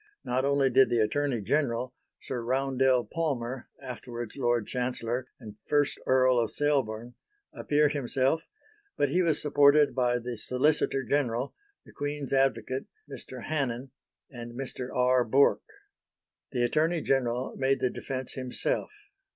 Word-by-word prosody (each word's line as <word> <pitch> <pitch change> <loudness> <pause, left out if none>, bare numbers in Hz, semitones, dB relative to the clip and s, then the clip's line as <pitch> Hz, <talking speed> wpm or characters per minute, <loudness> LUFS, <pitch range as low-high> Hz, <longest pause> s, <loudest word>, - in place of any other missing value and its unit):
Not 130 +2 0
only 140 -1 +2
did 130 0 +5
the 120 - +1
Attorney 130 +2 0
General, 125 +1 0 0.3
Sir 125 -3 -4
Roundell 130 0 +2
Palmer 135 -6 -3
(afterwards 120 -2 -7
Lord 120 -4 +1
Chancellor 125 0 -2
and 105 -4 -11
First 145 -1 +1
Earl 130 -1 +4
of 115 -2 +1
Selborne) 125 -5 -1 0.4
appear 150 0 +2
himself, 140 +2 0 0.5
but 145 - +2
he 180 +6 +2
was 165 -4 +2
supported 145 0 +4
by 125 -2 +2
the 120 -1 -5
Solicitor 135 +2 +1
General, 130 -3 0 0.3
the - - -15
Queen's 145 -1 -3
Advocate, 130 -1 +1 0.2
Mr. - - -9
Hannen 135 -4 -2 0.4
and 120 -2 -8
Mr. 130 0 -5
R. 125 0 +3
Bourke. 135 +5 +3 0.9
The 125 -3 0
Attorney 155 +7 +1
General 125 -2 0
made 135 0 +1
the 125 - 0
defence 130 -2 -4
himself. 130 -1 -2
130 Hz, 135 wpm, -28 LUFS, 120-140 Hz, 0.9 s, did